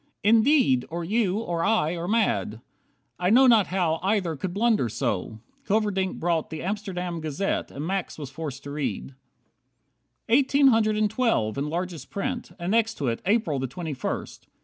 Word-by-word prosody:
Indeed, 225 - +4
Or 170 +1 -4
you, 200 +1 +1
or 175 -7 -2
I, 195 -6 +2
are 170 0 -4
mad. 115 - 0 0.6
I 180 0 +1
know 250 +5 +6
not 230 -6 +5
how 175 -4 0
Either 190 -4 0
could 175 +6 -4
blunder 210 - +2
so." 110 -3 -2 0.3
Hilverdink 205 -3 0
brought 165 -2 0
"The 160 -1 -6
Amsterdam 180 -4 -3
Gazette", 155 +5 -2
and 145 +2 -6
Max 190 0 -3
was 145 -4 -7
forced 145 -3 -6
to 140 - -7
read. 145 -1 -4 1.1
57 235 +4 +4
"Eighteen 280 0 +4
hundred 215 -3 +2
and 215 0 +3
twelve," 220 - +1
in 140 +2 -2
largest 175 0 -4
print; 200 -4 -4
And 175 +1 -3
next 225 0 +2
to 135 - -1
it, 115 - -3
"April 200 - +1
the 130 - -2
twenty 155 +4 -5
first." 130 - -5
180 Hz, 170 wpm, -25 LUFS, 150-215 Hz, 1.1 s, know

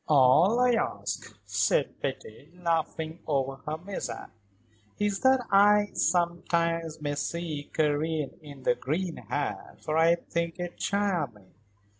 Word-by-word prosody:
"All 155 - +5
I 250 0 +5
ask," 100 - -2
said 100 -1 +1
Betty, 135 +8 -6
laughing 165 -1 -1
over 135 -2 0
her 155 +1 -2
mishap, 190 +4 -6 0.7
"is 205 -1 0
that 260 -1 +4
I, 205 +1 +5
sometimes, 170 -1 0
may 145 -1 -1
see 150 0 -3
Karen 155 -1 0
in 145 -3 -11
the - - +4
green 165 +7 -2
hat, - - -4
for 155 +1 0
I 165 +1 +5
think 170 0 -3
it 175 0 -5
charming." 165 - -1
165 Hz, 125 wpm, -28 LUFS, 145-180 Hz, 0.7 s, All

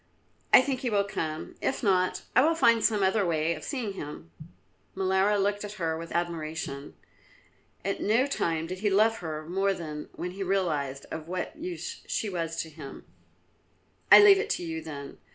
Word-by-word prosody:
I 255 - +9
think 265 -1 -2
he 255 -2 -2
will 205 -2 +2
come; 160 -5 -4
if 270 - -1
not, 185 -3 +2
I 250 - +7
will 325 +2 +3
find 230 -7 +4
some 210 -3 +3
other 190 +2 +2
way 165 -2 +1
of 155 - -9
seeing 240 -8 -3
him." 145 - -8 0.6
Molara 190 +2 +2
looked 205 +1 0
at 205 0 -6
her 165 -5 -2
with 165 +1 -7
admiration. 160 -4 -4 0.9
At 195 - -2
no 230 +5 +3
time 165 - -1
did 185 +2 -6
he 210 +1 +1
love 215 +3 +3
her 155 -2 -5
more 195 +2 +1
than 150 -3 -7
when 180 - -5
he 195 +2 -8
realised 155 -8 -1
of 160 0 -6
what 180 +1 -4
use 345 +2 -6
she 210 - -2
was 165 -2 -3
to 160 - -11
him. 145 -3 -10 1.1
"I - - +11
leave 400 -1 +8
it 415 +1 -2
to - - -1
you, 160 -1 -4
then. 140 -3 -8
185 Hz, 185 wpm, -28 LUFS, 160-210 Hz, 1.1 s, I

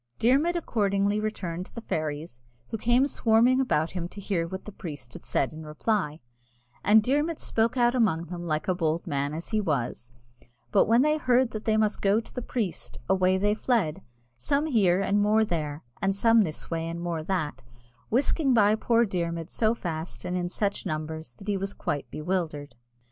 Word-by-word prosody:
Dermod 280 +9 +3
accordingly 205 - +1
returned 185 -4 -3
to - - -18
the 230 - -5
fairies, 150 - -4 0.3
who 225 - -3
came 240 +4 +4
swarming 245 -1 +3
round 265 - +1
about 160 -4 +1
him 175 -2 -3
to 200 - -11
hear 185 -4 -1
what 190 +2 -7
the 210 - -7
priest 145 -11 -8
had - - -10
said 135 - 0
in 160 0 -8
reply; 155 0 -1 0.6
and 210 +2 +6
Dermod 295 +6 +1
spoke 230 +3 0
out 240 0 +4
among 195 -10 +2
them 175 0 -6
like 155 -1 -1
a 185 - +3
bold 165 -2 -1
man 140 0 -1
as 165 - -6
he 215 -1 +1
was: 125 - -2 0.6
but - - +4
when 230 +4 +5
they 305 +1 +3
heard 255 -3 +3
that 215 0 -6
they 220 -1 +2
must 215 -1 +1
go 200 +2 +3
to 230 - -10
the 250 - -4
priest, 220 -7 -3
away 185 0 +3
they 205 +2 +2
fled, 210 - 0 0.3
some 280 - 0
here 200 - +3
and 200 +1 +2
more 215 +2 +4
there, 155 -6 -3 0.2
and 195 0 +1
some 230 +2 +5
this 160 -4 -3
way 165 0 -1
and 170 0 -5
more 170 -2 -2
that, 155 -6 -2 0.5
whisking 270 +2 +2
by 210 -2 +5
poor 230 +1 +3
Dermod 170 -4 -3
so 225 0 +1
fast 165 -4 -5
and 180 0 -2
in 175 -1 -1
such 200 +2 -1
numbers 155 -5 -5
that 195 - -13
he 205 -1 +1
was 195 +1 -4
quite 145 - -3
bewildered. 155 -3 -3
195 Hz, 195 wpm, -27 LUFS, 160-225 Hz, 0.6 s, and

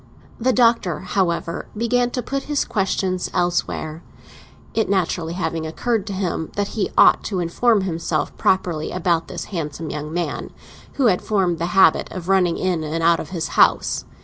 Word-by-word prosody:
The 255 +3 +2
Doctor, 230 -10 +2
however, 180 -2 -1
began 245 +2 +1
to 250 0 -3
put 275 +3 -3
his 295 -1 +1
questions 190 -2 -1
elsewhere; 175 -2 -1 0.7
it 220 - 0
naturally 175 -3 0
having 165 -2 -2
occurred 225 +6 -1
to 200 - -3
him 180 -4 -2
that 205 0 -1
he 210 - -2
ought - - +6
to 190 -4 -2
inform 205 +6 +2
himself 165 -4 -2
properly 175 -5 0
about 170 -2 0
this - - -6
handsome 155 -1 -4
young 150 0 -5
man 175 +1 -3 0.4
who 275 - +1
had 185 -6 +3
formed 185 -6 0
the 170 - -1
habit 190 - +5
of 185 -1 -6
running 185 -3 +3
in 180 -4 -1
and 160 +2 -3
out 170 0 +4
of 155 - -6
his 170 -4 -3
house. - - +3
180 Hz, 170 wpm, -21 LUFS, 165-200 Hz, 0.7 s, ought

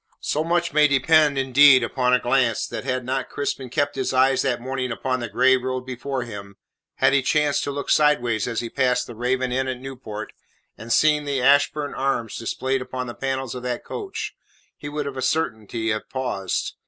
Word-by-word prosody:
So 155 - 0
much 170 0 0
may 150 0 +5
depend 145 +1 +3
indeed 135 0 +6
upon 125 +1 0
a 125 - +6
glance, 120 -2 +1
that - - -6
had 130 -2 -2
not 130 +1 -2
Crispin 135 -2 -3
kept 145 +2 -1
his 135 -1 -2
eyes 130 +1 +4
that 130 -3 0
morning 130 0 -3
upon 130 +2 -2
the 120 -2 -4
grey 130 +3 +4
road 130 0 -3
before 130 +1 -4
him, 100 -4 -9 0.4
had - - +3
he 140 - +4
chanced 150 +2 +1
to 140 - -2
look 140 0 -3
sideways 120 -8 +2
as 115 -2 -2
he 120 - -5
passed 125 -2 +1
the 120 - -9
Raven 125 +2 -1
Inn 130 +1 0
at 130 -1 -3
Newport, 125 -5 -8 0.4
and 115 +1 -9
seen 150 +2 +3
the 140 -2 -1
Ashburn 145 +2 +3
arms 125 -5 -1
displayed 130 +3 -2
upon 130 0 -5
the 120 - -6
panels 135 -1 -3
of 125 - -6
that 125 -1 -4
coach, 400 -3 -5 0.4
he 145 - -8
would 150 0 -3
of 140 -2 -5
a - - -3
certainty 110 -6 -1
have 110 0 -4
paused. 125 -8 -2
130 Hz, 200 wpm, -23 LUFS, 125-140 Hz, 0.4 s, indeed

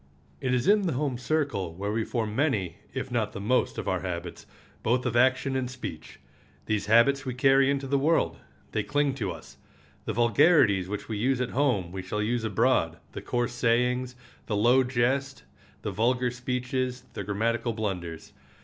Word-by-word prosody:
It 130 -2 -1
is 125 -1 +1
in 205 -1 +4
the 165 - 0
home 130 -2 -2
circle 125 - -1
where 100 +3 -3
we 110 +1 0
form 110 -2 -3
many, 105 - 0
if 130 0 -5
not 115 -3 -1
the - - -6
most, 120 +6 +1
of - - -4
our - - +1
habits, 85 -2 -6 0.3
both 125 +3 +1
of 120 -2 -1
action 130 +2 +3
and 130 -1 -1
speech. 125 -11 -8 0.5
These 105 -1 -1
habits 120 +5 +4
we 130 -2 -4
carry 135 +1 +4
into 140 -1 0
the 140 +1 +1
world. 135 - +1 0.3
They 110 - 0
cling 145 +5 0
to 105 -8 -3
us. - - -11 0.5
The - - -2
vulgarities 115 - +4
which 105 0 -5
we 110 - -3
use 130 +3 +1
at 125 -1 -2
home 120 -11 +1
we 95 +1 -5
shall 95 +3 -4
use 115 +2 -1
abroad—the 85 -8 0
coarse 120 0 -1
sayings, 125 +1 +1 0.3
the 105 - -1
low 120 +5 +4
jest, 130 +2 0 0.4
the 105 - -2
vulgar 125 +5 +1
speeches, 125 0 -3
the - - -4
grammatical 115 +3 -1
blunders. 90 -7 -5
120 Hz, 175 wpm, -27 LUFS, 105-130 Hz, 0.5 s, in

